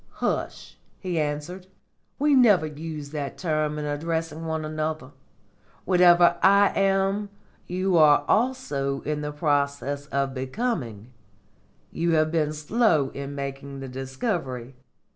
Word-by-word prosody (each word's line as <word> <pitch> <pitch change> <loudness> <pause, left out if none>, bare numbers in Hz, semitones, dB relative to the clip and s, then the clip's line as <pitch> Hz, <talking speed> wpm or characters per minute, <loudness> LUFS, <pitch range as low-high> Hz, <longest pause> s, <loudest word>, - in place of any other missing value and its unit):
"Hush!" - - -4 0.2
he 180 -4 -3
answered; 150 +5 -4 0.5
"we 295 +1 +2
never 215 - +5
use 150 -1 -7
that 145 -2 -5
term 155 -3 -1
in 150 - -3
addressing 160 +2 -3
one 160 -1 -2
another. 155 0 -4 0.7
Whatever 175 -1 +5
I 200 +1 +6
am, 195 +1 +1 0.4
you 185 0 0
are 150 -2 +5
also 150 - 0
in 150 -1 -3
process 145 -1 -1
of 140 -2 -1
becoming. 130 - -3 0.8
You 170 0 0
have 155 0 +2
been 155 -2 +1
slow 155 - +1
in 140 0 -6
making 140 0 -6
the 135 - -6
discovery. 130 - -4
155 Hz, 120 wpm, -25 LUFS, 140-180 Hz, 0.8 s, I